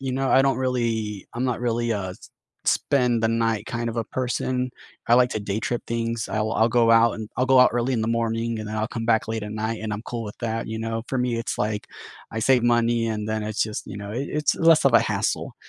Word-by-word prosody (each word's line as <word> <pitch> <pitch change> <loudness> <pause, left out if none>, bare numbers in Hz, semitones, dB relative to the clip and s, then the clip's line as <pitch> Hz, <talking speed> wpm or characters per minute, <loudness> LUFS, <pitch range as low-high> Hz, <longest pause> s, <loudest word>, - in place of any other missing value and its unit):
you 135 -1 -3
know, 135 +1 0
I 135 - +6
don't 135 0 +2
really 115 -6 -1
I'm 120 - -2
not 125 -3 -1
really 120 -1 0
a 100 -4 -2
s 90 - -13 0.3
spend 125 -4 +2
the - - +4
night 115 -1 0
kind 120 0 -3
of 115 - -5
a 115 - -1
person, 125 +1 -2 0.4
I 120 - +6
like 125 0 +4
to 110 - -2
day 100 0 -2
trip 120 +1 -2
things, 115 0 -2
I'll 110 0 -1
I'll 110 0 +3
go 115 -1 +3
out 115 0 +5
and 110 -2 -6
I'll 125 - +2
go 130 0 +5
out 125 - +7
early 120 +2 0
in 120 - 0
the 110 - -1
morning, 115 0 -1
and 110 -1 -5
then 110 - -4
I'll 110 0 0
come 115 -1 -4
back 115 -1 +2
late 110 -1 -2
at 105 0 -5
night, 110 +1 -3
and 110 -1 -3
I'm 105 +1 -4
cool 120 -1 -5
with 105 - -8
that, 115 -1 -3
you 110 0 -4
know, 115 0 -3
for 130 - -1
me, 125 -1 0
it's 115 - -3
like 105 +1 -2 0.4
I 115 - -4
save 125 +2 +3
money 120 -1 +2
and 105 -1 -3
then 110 0 -1
it's 105 0 -1
just, 110 -1 -4
you 95 - -7
know, 100 0 -7
it 130 +5 -3
it's 150 0 +1
less 165 -1 +4
of 135 - +5
a 115 - +8
hassle, - - -1
115 Hz, 265 wpm, -24 LUFS, 110-120 Hz, 0.4 s, a